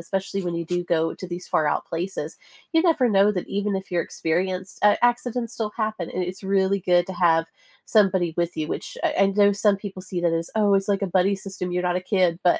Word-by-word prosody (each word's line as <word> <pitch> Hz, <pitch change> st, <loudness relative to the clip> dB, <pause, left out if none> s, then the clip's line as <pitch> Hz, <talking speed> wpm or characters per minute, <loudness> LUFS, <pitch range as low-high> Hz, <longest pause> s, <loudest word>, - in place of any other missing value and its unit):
especially 195 Hz, +2 st, -3 dB
when 175 Hz, -1 st, -3 dB
you 170 Hz, 0 st, -3 dB
do 175 Hz, +2 st, -1 dB
go 165 Hz, -1 st, +1 dB
to 185 Hz, -, -8 dB
these 175 Hz, +1 st, -6 dB
far 155 Hz, -, +1 dB
out -, -, 0 dB
places, 165 Hz, -2 st, -4 dB, 0.4 s
you 325 Hz, -, +4 dB
never 320 Hz, -7 st, +3 dB
know 200 Hz, 0 st, +4 dB
that 180 Hz, -3 st, -3 dB
even 200 Hz, 0 st, -1 dB
if 190 Hz, +1 st, -7 dB
you're 175 Hz, -1 st, +1 dB
experienced, 185 Hz, +3 st, -2 dB
a 205 Hz, 0 st, +4 dB
accidents 240 Hz, -1 st, 0 dB
still 215 Hz, -2 st, -3 dB
happen, 215 Hz, -6 st, -2 dB
and 180 Hz, -, -2 dB
it's 185 Hz, +3 st, -7 dB
really 195 Hz, 0 st, +1 dB
good 175 Hz, -1 st, +3 dB
to 190 Hz, -, -5 dB
have 165 Hz, -2 st, +3 dB, 0.4 s
somebody 190 Hz, -5 st, +2 dB
with 175 Hz, 0 st, -1 dB
you, 155 Hz, -, -1 dB
which -, -, -5 dB
I -, -, +1 dB
I -, -, +5 dB
know 200 Hz, +1 st, +4 dB
some 205 Hz, 0 st, +2 dB
people 195 Hz, -2 st, -8 dB
see 185 Hz, -1 st, -4 dB
that 170 Hz, -1 st, +1 dB
as, 165 Hz, 0 st, -2 dB
"Oh, 205 Hz, -2 st, +4 dB
it's 195 Hz, +1 st, +1 dB
like 200 Hz, -1 st, +1 dB
a -, -, +1 dB
buddy 190 Hz, +2 st, +2 dB
system, 190 Hz, -2 st, -6 dB
you're 180 Hz, 0 st, -1 dB
not -, -, 0 dB
a -, -, -1 dB
kid," 180 Hz, -2 st, +2 dB
but, 175 Hz, -, +4 dB
190 Hz, 245 wpm, -24 LUFS, 175-200 Hz, 0.4 s, I